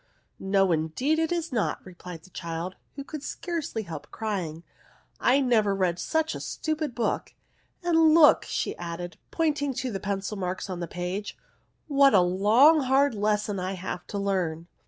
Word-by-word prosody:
" - - -47
No 195 -1 +2
indeed 165 - 0
it 325 0 0
is 340 -2 -2
not," 225 -5 0
replied 180 -2 -10
the 185 - -18
child, 170 +2 -5 0.2
who 280 - -6
could 305 +1 -7
scarcely 300 -6 -4
help 160 -5 -8
crying; 180 -7 -4 0.3
" - - -34
I 270 +3 +4
never 220 -6 +2
read 180 -3 0
such 320 0 0
a - - -5
stupid 310 -5 -3
book; 235 - -2 0.5
and 325 -2 +5
look," 315 -3 +6 0.3
added 175 0 -5
she, - - -26
pointing 295 -4 0
to 255 0 -2
the 195 - -3
pencil 200 +2 -3
marks 185 +1 -3
on 180 - -4
the 170 - -4
page, 180 +4 -4 0.3
" - - -44
what 275 -5 +5
a 190 - +7
long 215 - +5
hard 270 +1 +3
lesson 210 -1 0
I 185 +1 -2
have 180 -1 -6
to 205 - -4
learn 180 -5 -1
205 Hz, 175 wpm, -27 LUFS, 180-280 Hz, 0.5 s, a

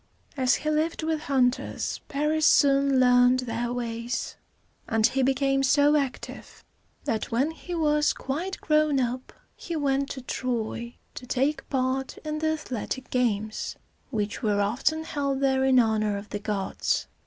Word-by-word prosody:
As 260 -2 +3
he 305 - -2
lived 315 +2 0
with 320 -1 0
hunters, 265 -4 0
Paris 300 +2 +1
soon 275 -1 +4
learned 250 0 +5
their 240 0 -3
ways; 235 0 -3 0.5
and 225 -1 +3
he 270 - +2
became 270 +1 +2
so 285 +2 +4
active 275 -4 -4 0.4
that 220 - -2
when 265 +7 +1
he 350 +2 -7
was 300 -2 +2
quite 335 +8 -4
grown 305 -3 +2
up 250 +1 -2 0.2
he 340 - -6
went 275 -2 0
to 265 - -6
Troy 235 -2 -3 0.2
to 250 - -9
take 275 +3 -1
part 260 0 -1
in 305 0 -2
the 315 0 +1
athletic 260 -3 -5
games, 220 -4 -1 0.3
which 210 -5 -3
were 210 -3 +1
often 245 +10 0
held 280 -4 -2
there 265 -1 +2
in 265 -1 +4
honor 215 -3 +2
of 200 +1 -9
the 205 - -4
gods. 205 -2 -1
265 Hz, 150 wpm, -26 LUFS, 240-290 Hz, 0.5 s, learned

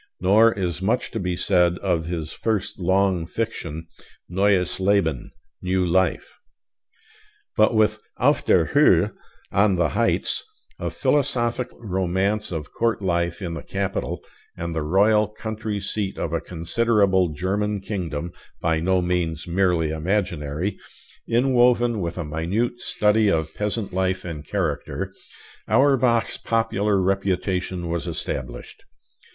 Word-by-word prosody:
Nor 110 +5 +5
is 90 -2 -3
much 110 +6 0
to 115 - -3
be 90 -2 -2
said 90 -2 +2
of 85 -5 -1
his 85 -2 -4
first 110 -5 -2
long 95 -2 +2
fiction, 80 -8 -4 0.4
'Neues 95 0 +1
Leben' 95 -8 +1 0.3
(New 90 0 +1
Life). 90 0 0 1.2
But 110 +2 +4
with 110 -1 +3 0.2
'Auf - - +3
der - - +3
Höhe' - - +5 0.4
(On 100 0 +3
the 85 -3 +2
Heights), - - 0 0.4
a - - -2
philosophic 125 -4 0
romance 95 +1 -1
of 80 -3 -5
court 115 -3 0
life 85 0 0
in 85 -2 -3
the 80 - -5
capital 95 0 -3 0.3
and 85 0 -4
the 80 - -1
royal 105 +7 +3
country 110 0 -4
seat 100 0 -2
of - - -3
a - - 0
considerable 95 +1 +1
German 100 +6 -1
kingdom 90 -5 -4 0.3
(by 80 -1 +1
no 90 +2 +1
means 85 -3 -1
merely 85 -3 +1
imaginary), 85 0 -2 0.5
inwoven 120 -1 +3
with 85 0 -3
a 85 - -3
minute 95 +11 -1
study 105 -1 +2
of 80 -3 0
peasant 105 -1 -2
life 95 0 0
and 75 -4 -6
character, 80 -8 -2 0.5
Auerbach's 130 -4 +3
popular 105 -3 +1
reputation 95 -1 -1
was 85 -3 -3
established. 65 -2 -5
95 Hz, 125 wpm, -23 LUFS, 85-105 Hz, 1.2 s, Nor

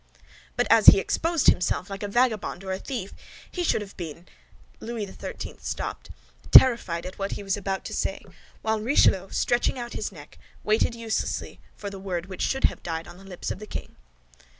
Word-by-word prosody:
"But - - +3
as - - +5
he - - +12
exposed 330 -3 0
himself 180 +1 +3
like 195 -1 -7
a 205 - -2
vagabond 220 -4 0
or 190 - -4
a 190 - -2
thief, 225 -7 -5 0.4
he 355 - -2
should 320 - +2
have 200 -1 -9
been—" 170 0 -7 0.5
Louis 230 -2 -4
XIII. 190 - -7
stopped, - - -5 0.4
terrified 235 -10 +6
at 185 +2 -8
what 195 0 -2
he - - -6
was 195 -1 0
about 195 -1 -3
to - - -5
say, - - -2 0.4
while 220 0 +1
Richelieu, 195 -6 +3
stretching 240 +2 +1
out 240 -1 -6
his 210 - -3
neck, 150 -5 -14 0.2
waited 220 +2 +2
uselessly 230 -1 -3 0.2
for 200 -1 -6
the 195 - -8
word 180 -3 -3
which 190 -1 -2
had 270 - 0
died 165 -1 -4
on 175 - -12
the - - -14
lips 190 -2 -6
of - - -5
the 215 - -9
king. - - -7
200 Hz, 190 wpm, -26 LUFS, 185-230 Hz, 0.5 s, he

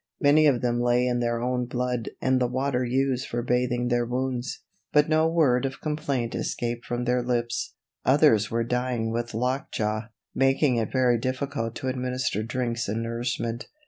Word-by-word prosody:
Many 155 0 +5
of 130 -5 +3
them 120 -1 0
lay 120 +1 +3
in 125 -1 +1
their 120 -1 0
own 125 0 -1
blood 125 -1 -2
and 130 0 +2
the 125 - +3
water 130 0 0
used 130 +1 0
for 120 0 -3
bathing 125 0 +1
their 120 -1 +2
wounds, 125 +1 -3 0.3
but 150 0 +4
no 155 0 +3
word 150 -7 +3
of 135 0 -3
complaint 145 -6 -2
escaped 120 0 -3
from 120 0 -2
their 125 0 +1
lips. 120 -1 -2 0.3
Others 130 -7 +4
were 115 0 0
dying 125 -1 -1
with 120 0 -3
lockjaw, 110 -3 -1 0.3
making 135 -1 +3
it 110 -2 -1
very 125 -3 +3
difficult 130 -2 -2
to 130 - -4
administer 125 -4 -1
drinks 120 0 -2
and 110 +3 -2
nourishment. 115 0 -3
125 Hz, 170 wpm, -26 LUFS, 120-130 Hz, 0.3 s, Many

